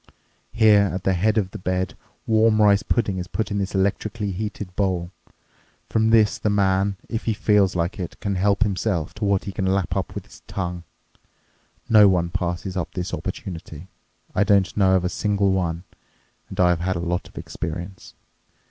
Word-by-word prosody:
Here 110 -2 +5
at 95 0 -4
the 95 - +2
head 105 +5 +1
of 95 -3 0
the - - -7
bed 95 0 -2 0.3
warm 110 0 +3
rice 105 -1 +5
pudding 100 -5 0
is 90 - -5
put 110 +2 -3
in 100 - -1
this 95 0 -3
electrically 100 +2 -1
heated 100 -1 -5
bowl. 90 -3 -1 0.8
From 110 0 +2
this 110 -2 +4
the 105 - 0
man, 100 -1 +1
if 115 - -4
he 110 - 0
feels 105 -3 +3
like 90 +5 -1
it, 90 - -6
can 100 -2 -2
help 100 +3 +2
himself 95 -5 -1
to 105 0 -4
what 100 -1 +1
he 100 - -5
can 95 0 -2
lap 95 -2 0
up 95 -4 -3
with - - -6
his - - -16
tongue. 90 -2 -4 1.0
No 105 -2 +7
one 85 -3 +1
passes 90 +2 -3
up 85 -3 -3
this 90 -1 -4
opportunity. 85 -1 -6 0.4
I - - +3
don't 100 -2 +2
know 95 -2 +4
of 90 -1 +1
a - - +3
single 100 +1 0
one, 85 -2 -1 0.7
and 95 - -8
I 90 -1 +5
have 85 -2 +1
had 95 +2 -1
a - - -2
lot 90 +1 -2
of - - -20
experience. 90 +4 -6
95 Hz, 190 wpm, -23 LUFS, 90-105 Hz, 1.0 s, No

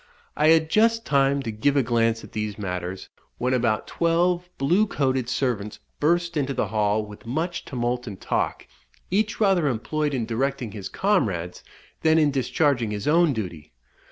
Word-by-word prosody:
I 150 - +3
had 160 0 +4
just 230 +1 +3
time 140 -1 +2
to 115 - -3
give 140 +7 +1
a 135 - +4
glance 115 -1 +1
at - - -12
these 105 -1 -3
matters, 90 -2 -5 0.3
when 125 +1 0
about 120 -4 +1
twelve 175 +1 +1
blue 180 +11 +2
coated 130 -7 0
servants 120 -5 -1 0.2
burst 170 +2 +1
into 140 -2 -1
the 110 -5 -1
hall 105 0 +1
with 105 +2 -13
much 165 +7 -2
tumult 125 -1 -2
and 100 -3 -7
talk, - - -2 0.5
each 215 +3 0
rather 190 -7 +3
employed 145 +4 -1
in 120 -3 -1
directing 125 +1 -2
his 100 -3 -7
comrades 100 - 0 0.4
than 160 0 +4
in 150 -2 +4
discharging 135 -3 +1
his 105 -1 -4
own 165 +1 +4
duty. 85 - -6
130 Hz, 165 wpm, -24 LUFS, 110-160 Hz, 0.5 s, had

